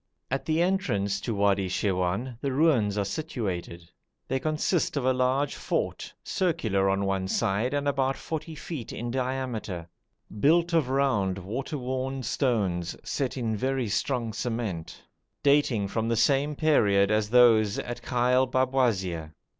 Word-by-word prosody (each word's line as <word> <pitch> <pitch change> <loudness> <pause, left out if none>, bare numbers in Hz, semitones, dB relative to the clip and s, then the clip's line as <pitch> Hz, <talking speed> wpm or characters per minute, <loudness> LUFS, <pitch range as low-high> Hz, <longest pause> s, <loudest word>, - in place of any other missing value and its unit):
At 135 - -1
the 160 +2 +2
entrance 100 - 0
to 115 0 -2
Wadi 100 -1 +2
Shirwan 95 +5 -1
the 140 - -1
ruins 130 -8 +2
are 100 - +1
situated. 95 - -4 0.4
They 130 - 0
consist 155 +2 0
of 135 - -1
a 130 - +4
large 130 +3 +1
fort, - - -3
circular 110 - 0
on 100 0 +1
one 95 -1 -1
side 105 +8 0
and 145 0 -1
about 135 -1 +1
40 160 0 -5
feet 145 -6 -6
in 120 +1 -4
diameter, 125 -9 -3 0.5
built 170 - +3
of 155 -6 +2
round, 125 -9 +1
water 120 - -4
worn 130 +1 -3
stones 100 - 0
set 135 -2 -2
in 115 -3 -1
very 130 +2 -1
strong 115 +1 -1
cement, 110 -7 -4 0.4
dating 140 -8 +3
from 110 +3 -2
the 115 - +1
same 140 +6 +2
period 105 -10 +3
as 105 -1 +1
those 115 -4 +5
at 120 0 -5
Ghail 125 +1 +2
Babwazir. 110 - 0
120 Hz, 145 wpm, -27 LUFS, 100-135 Hz, 0.5 s, those